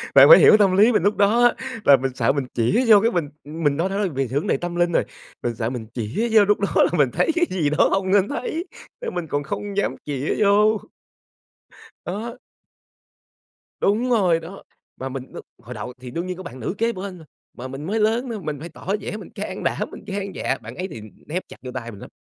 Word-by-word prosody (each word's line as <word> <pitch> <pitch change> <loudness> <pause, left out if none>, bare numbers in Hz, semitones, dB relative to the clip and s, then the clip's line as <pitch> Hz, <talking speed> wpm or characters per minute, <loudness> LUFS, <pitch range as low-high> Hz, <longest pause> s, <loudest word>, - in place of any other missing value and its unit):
bạn - - +9
phải - - +11
hiểu - - +8
cái - - +7
tâm 195 -3 +3
lý 215 +4 +6
mình 210 - +2
lúc 205 +2 +2
đó 205 +4 +3
á, 240 - +5 0.3
là 140 - +8
mình 130 0 -2
sợ 115 -3 +2
mình 140 -1 -2
chĩa 125 - +2
vô 215 -2 +8
cái 230 +2 +2
mình 165 -8 -1
mình 150 -1 -1
nói 175 +4 0
nó 200 +1 0
về 135 -5 -2
vấn 140 +5 -2
đề - - +2
tâm 175 +3 -5
linh 175 0 +2
rồi, - - +2 0.4
mình 120 -1 -2
sợ 110 0 -2
mình 120 -3 -6
chĩa 120 - -2
vô 215 -2 +6
lúc 205 +1 +2
đó 200 - 0
là - - +3
mình 140 -4 +4
thấy - - +2
cái 345 0 +3
gì 165 -6 0
đó 155 - +3
không 190 -1 0
nên 200 0 +4
thấy, 320 +4 -3 0.4
nên 485 - -5
mình 175 -2 -3
còn 145 -1 -2
không 200 +7 -5
dám 205 - 0
chĩa 145 -1 -2
vô. 210 +1 +4 1.3
Đó. 215 +6 -5 1.4
Đúng 225 +6 +1
rồi 185 -8 +3
đó, 175 +4 -10 0.3
mà 130 - -5
mình 130 0 -7
đ - - -11 0.3
hồi 125 +3 -9
đầu 110 +3 -6
thì 125 -1 -8
đương 170 +7 -4
nhiên 185 0 -4
có 185 - -8
bạn 130 -8 -9
nữ 120 - -3
kế 230 +1 +1
bên 190 -2 -6
rồi, 160 - -15 0.3
mà 125 +2 -7
mình 135 +3 -7
mới 215 +6 -1
lớn 225 +4 +1
nữa, 230 -2 -4
mình 150 -4 -4
phải 165 - -7
tỏ 160 - -15
vẻ 210 - -5
mình 215 - -10
can - - -6
đảm - - -1
mình - - -10
gan 200 -1 -4
dạ, - - -2
bạn - - -9
ấy 185 +1 -4
thì 115 - -9 0.3
nép 175 +5 -3
chặt - - -11
vô 125 - -6
tay 120 -2 -5
mình 100 -3 -12
lắm, - - -11
180 Hz, 250 wpm, -22 LUFS, 140-210 Hz, 1.4 s, phải